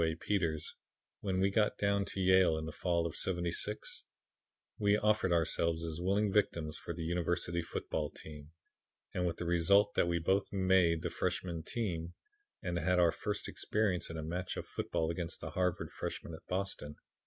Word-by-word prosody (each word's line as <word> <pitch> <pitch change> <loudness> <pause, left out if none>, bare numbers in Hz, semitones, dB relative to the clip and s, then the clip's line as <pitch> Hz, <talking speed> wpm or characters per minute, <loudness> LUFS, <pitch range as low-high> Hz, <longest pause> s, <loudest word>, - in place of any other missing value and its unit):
A. 80 -1 +1
Peters, 85 -4 -1 0.5
when 95 -2 -1
we 95 +1 +3
got 105 +1 +2
down 100 -1 +2
to 100 - -5
Yale 95 -3 +5
in 80 - -3
the 80 - -4
fall 85 0 0
of 80 -2 -3
'76, 90 +3 -2 0.8
we 100 0 +4
offered 105 -3 +2
ourselves 85 0 +1
as 80 +1 -4
willing 100 +3 +2
victims 85 -7 +1
for - - -6
the 85 0 -4
University 85 0 0
football 80 -2 -3
team, 75 -1 -10 0.6
and 90 0 0
with 85 - -2
the 85 - -4
result 85 +4 +4
that - - +3
we 85 0 +1
both 95 +4 +1
'made' 95 -4 +3
the - - -2
freshman 85 -3 -2
team, 85 -4 -3 0.5
and 90 -2 -1
had 90 +2 +2
our 85 -2 +5
first 105 +4 -3
experience 105 -5 0
in 80 - -5
a 80 - -4
match 90 +3 -3
game - - -2
of - - -22
football 80 0 -1
against 85 0 -4
the - - -6
Harvard 90 -1 0
freshman 85 - -5
at 80 - -11
Boston. 90 -6 -3
85 Hz, 180 wpm, -34 LUFS, 80-95 Hz, 0.8 s, Yale